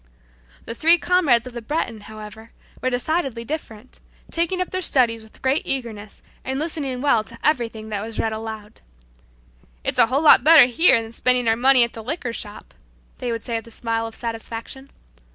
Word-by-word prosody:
The - - -5
three 330 +8 +5
comrades 320 -10 +2
of 255 - -9
the 240 - -6
Breton, 230 -3 -3
however, 215 +1 -11 0.3
were 255 - 0
decidedly 255 -1 -2
different, 250 -4 -8 0.3
taking 340 +2 +1
up 365 - -3
their 370 - -2
studies 240 -9 +2
with 220 0 -18
great 265 +3 +2
eagerness 220 -6 -4 0.2
and 265 0 -3
listening 285 -5 -3
well 235 -7 +3
to - - -14
everything 230 -7 -1
that 205 -2 -3
was 225 0 -7
read 220 - -1
aloud. 220 -1 -8 1.0
"It's - - -2
a - - +6
whole 270 +5 0
lot 300 - +7
better 310 -3 +8
here 250 +1 +4
than 225 - -10
spending 250 0 +1
our 225 - +3
money 255 +1 +5
at 235 - -2
the 225 - -8
liquor 250 -2 -4
shop," 210 -2 -7 0.5
they 245 -2 -3
would 230 -1 -4
say 230 -2 -3
with 225 - -8
a - - -11
smile 225 0 -3
of 225 - -11
satisfaction. 230 +3 -7
240 Hz, 190 wpm, -22 LUFS, 225-275 Hz, 1.0 s, better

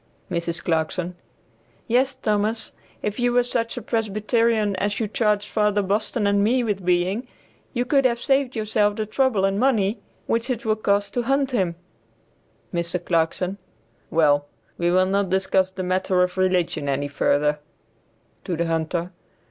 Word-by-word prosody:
Mrs. 170 0 -1
Clarkson. 170 +2 -1 0.7
"Yes, 260 +3 +2
Thomas, 220 -2 -1 0.3
if 210 +3 -2
you 245 0 +2
were 245 0 +3
such 235 -1 -2
a 245 - -5
Presbyterian 215 -1 +1
as 205 +1 -1
you 225 - 0
charged 210 -1 +1
Father 210 -1 +1
Boston 210 +3 0
and 200 0 +3
me 245 +4 +2
with 205 -4 -2
being, 180 +7 +1 0.5
you 245 +1 +1
could 275 +2 +3
have 235 -2 +2
saved 270 0 +1
yourself 215 -1 +1
the 215 - -2
trouble 215 -3 +1
and 195 +1 0
money 225 -4 +2 0.3
which 230 +3 -1
it 245 -3 -2
will 215 -1 +2
cost 200 -1 0
to 245 - 0
hunt 270 +2 +1
him." 185 -8 0 1.0
Mr. 170 0 -2
Clarkson. 180 +3 0 0.5
"Well, 145 -3 +3 0.3
we 175 0 0
will 185 +1 +4
not 195 0 0
discuss 190 0 +2
the 190 0 -5
matter 185 0 +1
of 180 0 -2
religion 180 -6 0
any 140 +1 -1
further." 150 +1 +1 0.9
(To 180 -4 -2
the 170 - 0
hunter.) 165 +2 -1
200 Hz, 155 wpm, -23 LUFS, 180-230 Hz, 1.0 s, will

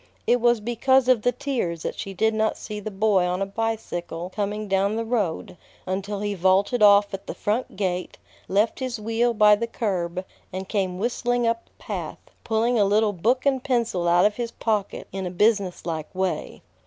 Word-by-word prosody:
It 245 0 +3
was 240 -1 +4
because 250 +3 +2
of 255 -4 +4
the 245 - +2
tears 230 - -3
that - - -2
she 195 - -6
did 220 +4 +1
not 220 0 0
see 210 0 -6
the 210 - -5
boy 200 -2 +2
on 180 +1 -1
a 195 - 0
bicycle 195 -5 -4
coming 210 +1 -2
down 195 +2 +1
the 230 0 -2
road, 205 -7 -2 0.3
until 200 +2 -3
he 205 0 -1
vaulted 195 +5 +2
off 205 -1 +6
at 195 - -6
the - - -5
front 220 +5 -2
gate, 185 -2 -2 0.3
left 205 +4 +1
his 255 -3 -3
wheel 225 +3 +1
by 210 -1 +6
the 230 +3 -3
curb, 185 -5 -2 0.3
and 190 +1 -5
came 190 -4 -1
whistling 245 +3 0
up 230 0 0
the - - -33
path, - - -7
pulling 230 +1 +1
a - - +5
little 205 +1 +2
book 235 +9 +1
and 265 -2 +2
pencil 230 -9 0
out 175 +1 +5
of 210 0 +1
his 240 -1 -2
pocket 215 -3 -2
in 190 -1 -4
a - - -3
business 200 0 +1
like 160 -3 -3
way. 190 0 -2
210 Hz, 195 wpm, -24 LUFS, 190-230 Hz, 0.3 s, off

